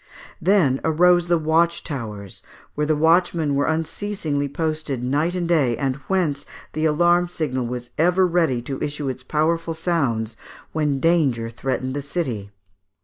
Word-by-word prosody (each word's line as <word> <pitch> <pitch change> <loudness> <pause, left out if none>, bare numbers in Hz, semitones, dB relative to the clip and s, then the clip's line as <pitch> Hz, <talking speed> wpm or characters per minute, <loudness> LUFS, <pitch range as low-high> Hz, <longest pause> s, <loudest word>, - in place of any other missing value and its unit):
Then 165 -8 +3
arose 175 +2 +4
the 175 -1 +3
watch 165 +2 +1
towers, 105 - -6 0.3
where 150 0 -1
the 155 - +2
watchmen 165 -1 +2
were 140 +1 +1
unceasingly 160 -2 -2
posted 155 -4 -2
night 150 +7 0
and 175 -2 -1
day, 140 -9 +2
and 135 -1 -1
whence 160 -7 0 0.3
the 155 +1 -1
alarm 175 +3 +3
signal 130 -8 -2
was 120 0 -6
ever 180 +3 +4
ready 165 -9 +1
to 135 +1 -5
issue 145 -1 -2
its 130 0 -5
powerful 160 +4 0
sounds 135 -10 -1 0.4
when 150 -3 0
danger 135 -9 +2
threatened 130 +1 -3
the 145 - -2
city. 135 - -3
155 Hz, 145 wpm, -22 LUFS, 130-170 Hz, 0.4 s, arose